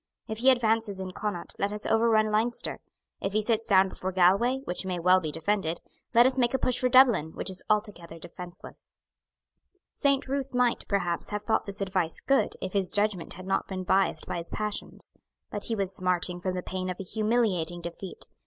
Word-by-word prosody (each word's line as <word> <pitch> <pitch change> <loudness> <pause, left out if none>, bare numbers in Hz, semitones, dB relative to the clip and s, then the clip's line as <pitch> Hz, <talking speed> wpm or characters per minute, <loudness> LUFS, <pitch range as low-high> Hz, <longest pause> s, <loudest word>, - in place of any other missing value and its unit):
If 220 0 -5
he 260 +3 +5
advances 225 -5 +2
into 185 -1 -5
Connaught, 205 -4 -4
let 200 - 0
us 210 0 -4
overrun 225 -1 +3
Leinster. 225 +3 -1 0.4
If 195 - -2
he 215 0 +1
sits 225 0 0
down 190 -2 +5
before 185 0 -5
Galway, 195 +9 +3
which 180 -7 -3
may 185 -1 -2
well 180 +2 +4
be 155 -4 -4
defended, 165 0 -1 0.4
let 240 +1 +8
us 260 +1 +2
make 240 +1 +2
a - - +3
push 255 -2 +1
for 250 - +2
Dublin, 240 - +5
which - - -2
is 185 - -3
altogether 205 -6 -1
defenceless." 175 +1 -11 1.0
Saint 280 -2 +2
Ruth 275 -1 -3
might, 245 -1 +1
perhaps, 180 -4 -1
have 210 0 -3
thought 220 0 0
this 200 0 -2
advice 185 -4 0
good, 275 0 +1
if 185 - -4
his 195 -3 +1
judgment 205 -4 0
had 185 - -10
not 195 - 0
been 185 -1 -4
biassed 190 +1 +2
by - - -4
his 170 0 -4
passions. 210 -1 -3 0.4
But 205 - -2
he 230 - -1
was 195 -2 -2
smarting 180 -1 0
from 185 0 -2
the 180 - -3
pain 185 0 -4
of 180 - -5
a - - -4
humiliating 205 -5 0
defeat. 170 +2 -8
200 Hz, 200 wpm, -28 LUFS, 180-225 Hz, 1.0 s, let